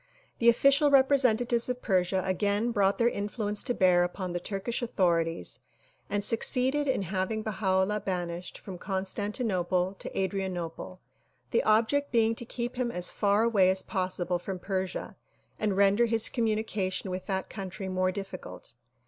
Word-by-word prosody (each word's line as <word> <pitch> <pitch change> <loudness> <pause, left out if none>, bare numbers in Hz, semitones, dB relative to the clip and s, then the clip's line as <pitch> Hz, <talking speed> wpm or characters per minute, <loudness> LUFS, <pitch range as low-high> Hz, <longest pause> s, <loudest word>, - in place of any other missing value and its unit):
The 235 - +5
official 275 +5 +4
representatives 255 -4 +3
of 250 0 -4
Persia 185 -2 +1
again 205 +4 0
brought 200 -3 +2
their 235 - +3
influence 210 -1 -1
to 245 - 0
bear 180 -1 +4
upon 180 +1 -4
the 175 - -2
Turkish 200 +6 -3
authorities 170 - 0 0.5
and 205 0 -1
succeeded 260 +6 +3
in 260 -7 0
having 190 +4 -2
Baha 190 -3 +1
'Ullah 210 +2 -1
banished 180 -2 -4
from 185 -3 -9
Constantinople 190 -1 -1
to - - -5
Adrianople, 185 -2 -4 0.5
the 235 - +3
object 230 +7 +2
being 225 -1 +3
to 235 - -4
keep 240 +1 -4
him 250 -1 0
as 180 -6 +1
far 205 +1 +2
away 205 -5 +4
as 190 0 +1
possible 185 -2 -1
>from 190 +2 -5
Persia 185 0 -4 0.4
and 205 -3 0
render 200 +4 +4
his 225 -1 +3
communication 215 -5 -1
with 185 0 -5
that 190 -2 -2
country 195 -1 -6
more 185 0 0
difficult. 195 - -8
200 Hz, 150 wpm, -28 LUFS, 185-230 Hz, 0.5 s, The